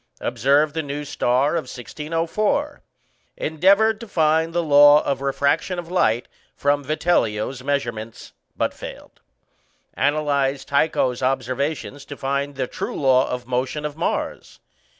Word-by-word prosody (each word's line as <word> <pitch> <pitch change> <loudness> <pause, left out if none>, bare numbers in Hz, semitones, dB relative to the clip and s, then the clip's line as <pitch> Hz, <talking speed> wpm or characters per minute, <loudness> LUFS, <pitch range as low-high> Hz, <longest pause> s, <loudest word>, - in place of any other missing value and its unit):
Observed 145 +3 +2
the 160 - -1
new 145 0 -5
star 135 +1 +1
of 165 -4 -1
1604. 165 - -2 0.6
Endeavoured 200 +8 +3
to 230 - -9
find 160 -2 +2
the 170 0 0
law 145 0 +7
of 140 -1 -2
refraction 140 +6 0
of 175 0 -6
light 120 -10 +1 0.3
from 145 0 +1
Vitellio's 130 -5 0
measurements, 120 -6 -4 0.2
but - - 0
failed. - - -11 0.7
Analyzed 140 -2 0
Tycho's 140 -4 +1
observations 135 +3 -2
to 145 - -9
find 140 +1 -2
the 135 -1 -1
true - - -5
law 130 -1 +3
of 125 0 -4
motion 130 +4 -2
of 150 -1 -4
Mars. 165 - -3
145 Hz, 130 wpm, -22 LUFS, 135-160 Hz, 0.7 s, law